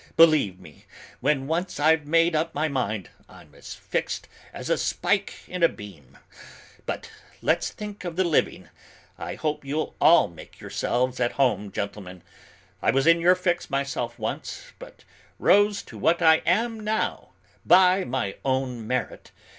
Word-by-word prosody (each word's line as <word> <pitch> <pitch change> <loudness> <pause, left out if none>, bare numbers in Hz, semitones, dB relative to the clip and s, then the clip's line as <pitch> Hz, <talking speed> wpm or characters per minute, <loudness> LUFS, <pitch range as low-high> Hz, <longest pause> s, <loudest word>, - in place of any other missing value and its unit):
Believe 155 - +5
me, 75 -6 -16 0.3
when 135 0 +1
once 165 +2 -2
I've 155 0 +3
made 165 +1 +3
up 160 +2 -1
my 155 +2 +1
mind, 110 - -2 0.2
I'm - - -16
as - - -10
fixed - - -3 0.2
as - - -7
a - - +2
spike 200 +2 -1
in 180 -1 -6
a 170 - +6
beam! 80 -11 -13 0.7
But - - -5 0.3
let's - - +1
think 210 -2 -8
of 175 -2 -5
the 185 - +2
living. 170 -4 0 0.5
I - - -5
hope 150 -2 -3
you'll 145 +3 -3
all 170 - +6
make 85 -2 -14
yourselves 125 +1 -1
at 120 -1 0
home, 105 -7 +1
gentlemen: 95 -3 -6 0.6
I - - +1
was 135 +2 +2
in 165 0 +5
your 180 +2 +5
fix 175 -1 -1
myself 135 -4 -2
once; 110 -2 -5
but - - -13 0.3
rose 205 +1 +3
to - - -12
what 170 +1 +2
I 160 -2 +6
am 225 +5 +1
now 215 +1 -2 0.3
by 185 +1 +5
my 120 - -3
own 130 -4 -2
merit. 125 -1 -3
150 Hz, 155 wpm, -25 LUFS, 120-175 Hz, 0.7 s, a